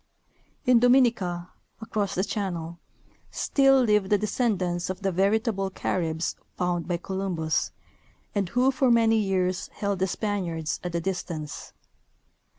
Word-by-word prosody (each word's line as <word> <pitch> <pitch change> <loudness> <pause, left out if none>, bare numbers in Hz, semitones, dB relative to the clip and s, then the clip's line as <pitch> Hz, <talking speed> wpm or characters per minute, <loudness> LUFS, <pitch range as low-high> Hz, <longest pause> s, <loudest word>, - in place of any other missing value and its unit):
In 250 -2 +6
Dominica, 230 -9 +3 0.3
across 210 -3 -2
the 185 - +1
channel, 175 -6 -3 0.5
still 270 -2 +3
live 210 -4 +2
the 210 - +4
descendants 195 -5 -1
of 185 +2 -5
the 195 - +1
veritable 195 +2 +1
Caribs 165 -3 -2 0.2
found 175 -2 -1
by 175 -1 0
Columbus, 175 -4 -2 0.6
and 200 -4 -1
who 250 +5 +3
for 265 -1 +2
many 225 -1 +4
years 185 -2 0
held 200 -2 -2
the 190 - +2
Spaniards 175 -6 -2
at 175 -1 -4
a - - +2
distance. 165 -4 -4
195 Hz, 130 wpm, -26 LUFS, 175-220 Hz, 0.6 s, In